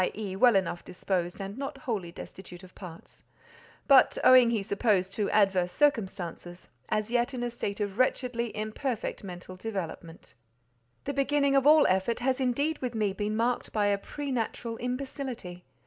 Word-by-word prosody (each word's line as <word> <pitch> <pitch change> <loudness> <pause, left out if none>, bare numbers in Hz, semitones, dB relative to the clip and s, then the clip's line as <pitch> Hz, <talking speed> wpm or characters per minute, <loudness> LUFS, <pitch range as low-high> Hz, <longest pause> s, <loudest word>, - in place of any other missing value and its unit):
e. 205 -3 -4
well 240 +3 +5
enough 185 -2 0
disposed, 180 -1 -3
and 200 +5 -6
not 275 0 -5
wholly 200 -10 -3
destitute 180 +1 -11
of 185 - -14
parts), 170 -4 -11 0.7
but, 275 -2 +6
owing 255 -2 +7
he 225 -4 0
supposed 195 -2 +1
to 210 -1 -1
adverse 195 -4 +2
circumstances, 185 - -1 0.2
"as 215 +1 -1
yet 245 +2 +1
in 245 - -3
a 240 - -2
state 205 -3 -4
of 205 +1 -3
wretchedly 245 -2 0
imperfect 215 +3 -3
mental 180 -1 -8
development." 185 -5 -6 0.7
The 280 - -3
beginning 280 0 +2
of 275 +1 +4
all 305 0 +7
effort 190 +5 +1
has 260 +1 0
indeed 280 +5 0
with 245 -2 -4
me 210 -3 0
been 210 +1 -2
marked 240 +2 0
by 210 -2 +1
a 200 - +2
preternatural 240 -3 -4
imbecility. 250 -7 -5
220 Hz, 160 wpm, -28 LUFS, 190-255 Hz, 0.7 s, owing